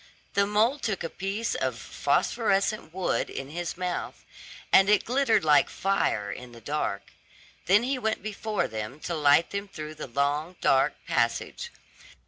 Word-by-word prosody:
The 200 0 +3
mole 220 +7 +2
took 215 -7 -2
a 165 - -4
piece 200 +5 -2
of - - -2
phosphorescent 200 -5 0
wood 185 +2 -1
in 135 +1 -6
his 175 +1 -4
mouth, 180 -1 -4 0.5
and 195 +1 +7
it 210 -1 +4
glittered 250 -7 +2
like 145 -2 +5
fire 190 - 0
in 125 +3 -9
the 115 - -11
dark; 115 -6 -3 0.6
then 205 +5 +5
he 260 +1 -1
went 220 -2 -1
before 215 0 -2
them 110 +5 -6
to 175 - -3
light 150 +1 +4
them 200 0 -3
through 155 -5 -7
the 155 - -7
long, 145 +6 -1
dark 135 0 +3
passage. - - -1
180 Hz, 155 wpm, -27 LUFS, 145-210 Hz, 0.6 s, and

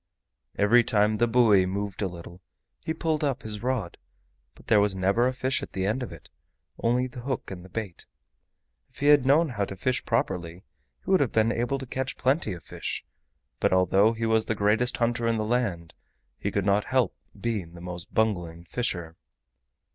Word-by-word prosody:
Every 115 +4 +5
time 105 -1 +2
the 120 - +3
buoy 110 -6 +4
moved 100 +1 -3
a 100 - +1
little 85 0 -10 0.4
he - - -2
pulled 160 -1 -1
up 140 -4 -1
his 105 -1 -5
rod, 120 -7 -2 0.6
but - - -18
there 110 - +4
was 100 -1 +2
never 100 +6 +2
a - - +1
fish 130 +1 -1
at - - -8
the 95 0 -1
end 110 +6 0
of 125 - -5
it, 85 - -12 0.5
only 125 +2 +2
the 125 -1 -8
hook 130 -3 -4
and 90 -2 -7
the 95 - -13
bait. 100 -3 -6 0.8
If - - -21
he 140 - -3
had 145 -3 +6
known 155 +4 +4
how 105 -5 -1
to 95 - -7
fish 125 +7 -1
properly, 90 -6 -2 0.4
he - - -2
would 190 - +5
have 135 -5 +1
been 110 +1 +3
able 120 +3 -1
to 130 - -6
catch 130 +1 -4
plenty 130 - +1
of 85 - -9
fish, - - -5 0.5
but - - +2
although 95 +4 +4
he 115 0 -3
was 110 -1 +2
the 110 - 0
greatest 105 +4 +2
hunter 120 0 0
in 115 -1 +1
the 110 - -1
land 105 -8 -1 0.5
he 100 - -1
could 100 -1 -1
not 100 +1 +2
help 130 -6 +1 0.2
being 105 -8 -3
the - - -10
most 90 -1 -7
bungling 90 -7 0
fisher. 85 -6 -3
110 Hz, 200 wpm, -27 LUFS, 95-125 Hz, 0.8 s, had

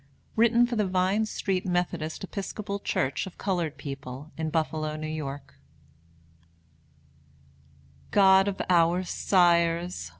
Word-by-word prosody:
Written 235 +1 +4
for 240 0 -3
the 210 -3 +1
Vine 190 +4 +1
Street 190 -3 -2
Methodist 175 -2 -2
Episcopal 200 +1 -5
Church 135 -4 -1
of 185 - -11
colored 175 -6 -2
people, 140 0 -8
in 160 -1 -3
Buffalo, 155 -1 -1
N. 155 - -6
Y. 155 -3 -4 2.7
God 195 -1 +5
of 200 -1 -3
our 175 0 +3
sires! 170 - +2
175 Hz, 110 wpm, -27 LUFS, 155-195 Hz, 2.7 s, God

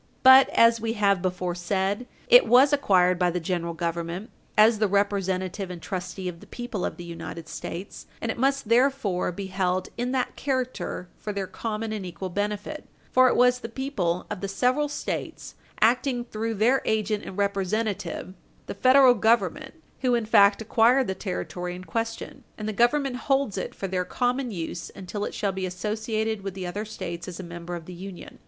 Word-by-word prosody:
But, 260 +1 +9
as 230 -1 +4
we 225 0 -1
have 200 -4 +2
before 180 -1 -2
said, 190 +6 -1 0.2
it - - +7
was 270 +4 +6
acquired 185 -10 +3
by 180 -1 +3
the 175 +1 -1
General 170 -1 -2
Government 170 +4 -3 0.3
as 215 +1 +6
the 215 - +3
representative 195 -1 0
and 180 -1 -7
trustee 185 +1 -5
of 170 -2 -5
the - - -15
people 240 -6 -5
of - - -3
the 175 - -8
United 165 -1 -7
States, 185 +5 -7
and 225 - -2
it - - -6
must 275 -1 +1
therefore 235 -7 +2
be 195 +3 -6
held 185 -1 -1
in 245 +1 -1
that 260 -1 -1
character 255 -8 -3
for 210 - -4
their 200 -1 -3
common 215 +3 -4
and 210 -3 -4
equal 180 +1 -6
benefit, 205 - -3 0.2
for 255 0 +6
it - - +2
was 250 0 +4
the 230 - -7
people 215 -9 -2
of - - -4
the 195 - -2
several 255 +9 +1
States, - - -5 0.3
acting 245 +2 +2
through 225 -1 -3
their 240 +6 +3
agent 215 -1 0
and 185 - -8
representative, 200 0 -1 0.3
the - - -5
Federal 255 +4 +6
Government, 230 - +1 0.2
who 250 -2 +2
in 235 -2 0
fact 205 0 +5
acquired 240 +4 +4
the 190 - -2
Territory 180 -2 -4
in 180 - -9
question, 225 +3 -4
and 215 - -5
the 215 - -2
Government 250 +4 +2
holds 270 -5 0
it 185 - -4
for 195 - -4
their 185 -1 -1
common 250 +5 -1
use 170 -3 -5
until 200 +2 -5
it - - -6
shall 200 -2 0
be 190 0 -3
associated 215 +3 -2
with 195 -1 -5
the 190 -1 -5
other 205 +5 -4
States 170 -5 -6
as 180 -1 -7
a - - -5
member 175 0 -7
of 170 -2 -8
the 180 - -9
Union. 185 +1 -10
205 Hz, 190 wpm, -26 LUFS, 185-240 Hz, 0.3 s, But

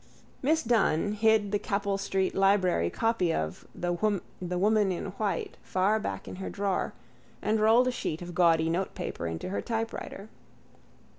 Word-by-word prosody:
Miss 315 +4 +2
Dunne 205 -5 +2
hid 215 -1 +3
the 205 - +1
Capel 200 -1 -1
street 190 -1 0
library 190 - +3
copy 225 - +1
of 80 - -3
The 175 0 -2
Woman 195 +1 0
in 175 - -3 0.2
White 205 -2 -2
far 195 +4 +1
back 95 - -4
in - - -7
her 190 - -5
drawer 200 -2 -1 0.5
and 215 +1 +1
rolled 225 +4 +5
a - - +2
sheet 170 -8 -3
of 175 0 -7
gaudy 165 -2 +4
notepaper 170 - -2
into 80 - -4
her 195 - -2
typewriter. 225 -3 -4
195 Hz, 150 wpm, -29 LUFS, 175-215 Hz, 0.5 s, rolled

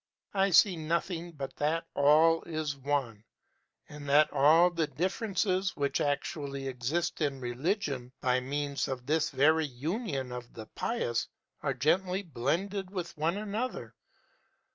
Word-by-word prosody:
I 195 0 +3
see 185 0 +5
nothing 170 +2 -2
but 135 -3 -6
that 160 +3 0
All 155 +3 +5
is 155 -3 -3
One, 135 -6 -2 0.6
and 145 -1 -8
that 150 +2 +5
all 165 +6 +6
the 165 -3 0
differences 190 - -1
which 140 -1 0
actually 140 -1 -2
exist 140 +8 -2
in 140 -3 0
religion, 130 - -2
by 125 0 +2
means 140 +2 -2
of 130 -2 -5
this 155 +2 +1
very 155 +3 +3
union 140 - -3
of 125 -1 -7
the 110 - -8
pious, 120 - -2 0.3
are - - -1
gently 185 +5 +1
blended 180 +7 -2
with 180 -3 -5
one 160 +5 0
another. 215 +4 -4
155 Hz, 135 wpm, -30 LUFS, 135-175 Hz, 0.6 s, all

